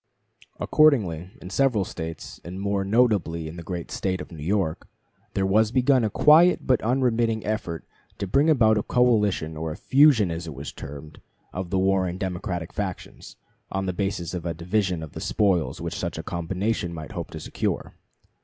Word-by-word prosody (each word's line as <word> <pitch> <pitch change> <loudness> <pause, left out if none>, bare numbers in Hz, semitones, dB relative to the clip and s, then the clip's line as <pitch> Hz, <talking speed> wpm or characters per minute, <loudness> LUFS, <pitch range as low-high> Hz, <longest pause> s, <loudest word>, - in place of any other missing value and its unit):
Accordingly, 100 - +3
in 90 - -8
several 125 -5 +2
States, 80 -2 -7
and 90 +2 -7
more 100 0 0
notably 100 -7 +1
in 80 - -8
the 85 - -7
great 85 0 -6
State 95 -1 -1
of - - -8
New 80 -3 -9
York, 90 -2 -1 0.5
there 95 - +1
was 105 +3 +3
begun 130 0 +3
a 110 - +1
quiet 160 - +5
but 130 -3 +3
unremitting 115 -2 +1
effort 90 -8 -3 0.3
to - - -3
bring 140 - +3
about 110 -8 +4
a - - 0
coalition 105 -10 +2
or 80 0 -4
"fusion," 130 - +4
as 85 +1 -5
it 80 - -7
was - - -6
termed, 75 +2 -10 0.3
of 90 -1 -4
the 95 - 0
warring 95 -1 +1
Democratic 90 -3 -4
factions, - - -6 0.4
on 95 0 -2
the 95 - -1
basis 90 -2 -2
of 90 -2 -4
a 85 -1 -3
division 90 0 -1
of 80 - -8
the - - -8
spoils 95 -6 +1
which - - -4
such - - -3
a - - -5
combination 90 +2 -2
might 80 -2 -7
hope - - -5
to - - -7
secure. - - -3
95 Hz, 180 wpm, -25 LUFS, 85-110 Hz, 0.5 s, quiet